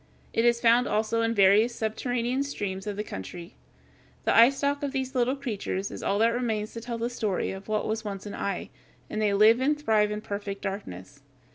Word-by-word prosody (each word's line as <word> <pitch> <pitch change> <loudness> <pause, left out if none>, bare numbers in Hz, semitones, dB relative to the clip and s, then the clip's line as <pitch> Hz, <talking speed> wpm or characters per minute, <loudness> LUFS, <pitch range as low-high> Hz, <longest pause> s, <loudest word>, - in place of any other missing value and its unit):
It 230 - +2
is 235 0 +4
found 235 +1 +4
also 220 +2 0
in 230 0 0
various 205 +4 +5
subterranean 240 +3 -1
streams 205 -8 -4
of 205 - -3
the 210 - -2
country. 170 - -8 0.7
The - - +3
eyestalk 275 +4 +4
of 285 -1 -3
these 265 -1 -2
little 255 +1 +1
creatures 210 -7 -3
is - - -7
all 200 - 0
that 230 +2 +3
remains 225 -3 -2
to 230 - -6
tell 235 0 -4
the 230 +1 -1
story 220 -6 -2
of 190 +1 -8
what 215 -1 -1
was 220 +1 -2
once 200 -2 -6
an 205 - -6
eye, 200 -2 -3 0.4
and 215 - -2
they 205 -2 +2
live 220 +4 +6
and 295 +3 +1
thrive 215 -7 +2
in 210 0 -4
perfect 200 -1 -5
darkness. 140 - -6
220 Hz, 205 wpm, -27 LUFS, 200-240 Hz, 0.7 s, live